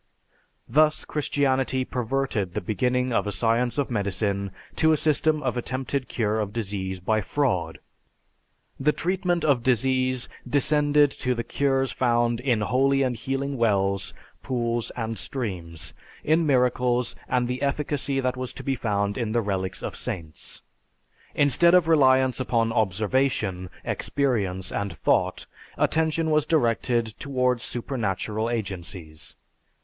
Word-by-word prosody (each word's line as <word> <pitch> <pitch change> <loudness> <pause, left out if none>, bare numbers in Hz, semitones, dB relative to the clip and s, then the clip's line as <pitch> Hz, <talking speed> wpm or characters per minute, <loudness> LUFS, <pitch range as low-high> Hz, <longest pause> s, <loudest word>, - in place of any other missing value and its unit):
Thus 155 +1 +3
Christianity 135 -3 0
perverted 125 -7 -2
the - - +1
beginning 125 +6 0
of 100 -2 +1
a - - -1
science 115 - +1
of 140 -3 -1
medicine 100 -2 -1 0.3
to 160 - +4
a 155 - +4
system 155 0 +1
of 125 -1 -1
attempted 130 +2 -3
cure 110 -2 0
of 105 -2 -2
disease 95 -4 -3
by 110 +4 +1
fraud. 90 - -1 1.0
The 150 +3 +2
treatment 180 -1 0
of 140 -5 +3
disease 130 +1 +2 0.2
descended 145 +1 +3
to 125 -1 +1
the 115 - -2
cures 135 -1 0
found 120 -1 +1
in 125 -4 +1
holy 135 +6 +2
and 125 -2 0
healing 135 +3 -3
wells, 100 -4 +1 0.3
pools, 120 -2 -1
and 115 -1 -3
streams; 90 - -4 0.3
in 160 +1 +2
miracles 125 -2 +2
and 125 -1 +1
the 125 +1 -3
efficacy 140 -1 0
that 130 0 0
was 130 -1 -5
to - - -9
be 135 - 0
found 100 -3 -1
in 110 -2 -2
the 120 - +2
relics 95 -3 -2
of - - -4
saints. 80 -4 -5 0.7
Instead 160 +5 +5
of 180 -3 +4
reliance 130 -5 +4
upon 115 -3 +1
observation, 110 -2 0 0.2
experience, 100 -10 -1
and 100 -1 -2
thought, - - +1 0.3
attention 160 0 +1
was 150 -1 +2
directed 120 -5 +2
toward 125 -3 0
supernatural 110 -3 -2
agencies. 90 -8 -6
125 Hz, 135 wpm, -25 LUFS, 105-135 Hz, 1.0 s, Instead